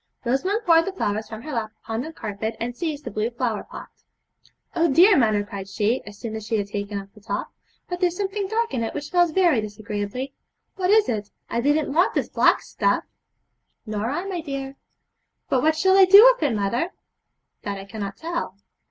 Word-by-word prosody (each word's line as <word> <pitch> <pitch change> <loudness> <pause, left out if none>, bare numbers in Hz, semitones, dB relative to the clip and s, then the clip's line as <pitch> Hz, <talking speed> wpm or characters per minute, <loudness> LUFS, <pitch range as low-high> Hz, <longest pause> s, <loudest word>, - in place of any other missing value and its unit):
Rosamond 370 - 0
poured 330 -1 +5
the 390 - -2
flowers 215 - -2
from 220 0 -8
her 310 - -6
lap 225 -4 -2
upon 225 +1 -3
the 315 - -6
carpet, 220 -4 -5
and 240 +1 -3
seized 305 -1 -3
the 240 - -5
blue 215 +3 -1
flower 235 -3 -2
pot. - - -10 0.9
'Oh, 335 -2 +3
dear 370 +8 +7
mother,' 215 -6 +3
cried 200 -1 -8
she, 210 +5 0
as 205 0 -10
soon 220 0 -6
as 220 - -5
she 220 +1 -1
had 205 - -1
taken 200 0 -4
off 195 0 -12
the 210 - -17
top, 205 -1 -4 0.4
'but 355 -1 -4
there's 355 -1 +1
something 395 0 -2
dark 460 +3 -1
in 245 - -1
it 225 - -4
which 295 0 -5
smells 350 -1 +4
very 330 -8 +3
disagreeably. 210 +5 -5 0.4
What 370 -1 -1
is 430 0 +5
it? 210 -2 -2 0.2
I 235 - 0
didn't 290 +2 +1
want 345 +4 +3
this - - 0
black - - +3
stuff.' - - 0 0.8
'Nor 215 +1 -2
I, 345 +8 -2
my 370 -3 -3
dear.' 275 -3 -5 0.7
'But 255 - +2
what 315 +2 +3
shall 380 +3 +4
I 390 -1 +8
do 400 +3 +9
with - - -16
it, 285 -7 +1
mother?' 235 - -1 0.7
'That 200 -1 -4
I 195 - -8
cannot 200 -1 -6
tell.' 330 - -4
250 Hz, 205 wpm, -23 LUFS, 210-340 Hz, 0.9 s, do